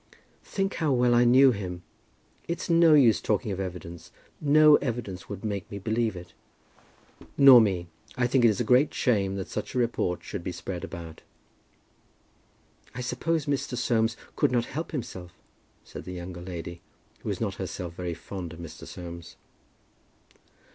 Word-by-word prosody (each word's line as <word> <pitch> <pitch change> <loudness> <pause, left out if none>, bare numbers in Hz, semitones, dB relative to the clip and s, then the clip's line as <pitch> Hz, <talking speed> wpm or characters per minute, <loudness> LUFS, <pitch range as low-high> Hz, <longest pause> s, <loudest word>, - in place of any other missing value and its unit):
"Think 195 0 -2
how 160 -4 +1
well 125 -1 +3
I 120 +1 +5
knew 130 +2 +7
him. 90 -5 -5 0.6
It's 170 0 -3
no 165 -2 +6
use 125 -7 +5
talking 105 0 -1
of 95 - -4
evidence. 85 -3 -7 0.3
No 150 0 +6
evidence 115 -8 -5
would 100 +1 -6
make 100 -3 -3
me 100 - -6
believe 110 +1 -1
it." 90 -1 -10 1.0
"Nor 135 -4 +9
me; 95 -5 0 0.3
and 125 - +1
I - - +5
think 125 +1 +2
it 110 -4 +4
a - - +1
great 130 +4 +3
shame 100 -6 +1
that 95 -2 -4
such 105 - -5
a - - 0
report 115 -7 0
should 100 -4 -6
be 90 - -3
spread 90 0 -6
about." 85 -3 -8 1.7
"I 125 - -4
suppose 145 +6 -1
Mr. 140 -3 -2
Soames 115 -2 +1 0.2
could - - +2
not 120 -2 +1
help 160 +5 -5
himself?" 95 - -6 0.5
said - - -10
the 90 - -6
younger 90 0 -7
lady, 85 -1 -7 0.4
who - - -6
was - - -2
not - - -1
herself 85 -2 -5
very 85 -1 -4
fond 85 0 -7
of 85 - -12
Mr. 85 -2 -9
Soames. 85 -1 -9
110 Hz, 165 wpm, -27 LUFS, 90-125 Hz, 1.7 s, Nor